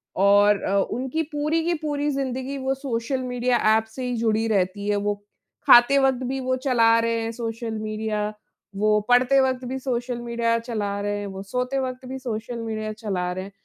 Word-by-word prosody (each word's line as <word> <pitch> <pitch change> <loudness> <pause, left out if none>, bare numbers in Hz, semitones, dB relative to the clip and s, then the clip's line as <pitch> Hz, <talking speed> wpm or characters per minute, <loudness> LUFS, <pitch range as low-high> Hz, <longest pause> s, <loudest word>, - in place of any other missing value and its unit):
और 200 +1 +5
अ, 195 - 0 0.2
उनकी 260 +6 -2
पूरी 305 +2 0
की 345 - +1
पूरी 295 -1 -1
ज़िन्दगी 270 0 -3
वो 265 0 -1
सोशल 260 -1 -2
मीडिया 250 0 0 0.2
ऐप 220 - -1
से 260 - -4
ही 250 -1 -2
जुड़ी 225 0 +1
रहती 200 -1 0
है, 205 - +2
वो 205 0 0 0.5
खाते 240 +3 +8
वक्त 265 -1 +2
भी 265 +1 -2
वो 255 0 0
चला 230 -3 +4
रहे 230 0 0
हैं 225 0 -3
सोशल 230 0 -4
मीडिया। 215 -1 -2 0.4
वो 210 +1 +3
पढ़ते 250 +2 +5
वक्त 260 -1 0
भी 260 +2 -3
सोशल 245 -2 -2
मीडिया 235 -1 0
चला 210 -4 -3
रहे 205 0 -1
हैं। 205 - -5
वो 190 -1 -7
सोते 250 +6 -2
वक्त 255 0 -4
भी 265 - -4
सोशल 235 -1 -4
मीडिया 215 -1 -3
चला 195 -5 -3
रहे 185 +1 -4
हैं। 195 - -10
235 Hz, 195 wpm, -24 LUFS, 215-260 Hz, 0.5 s, खाते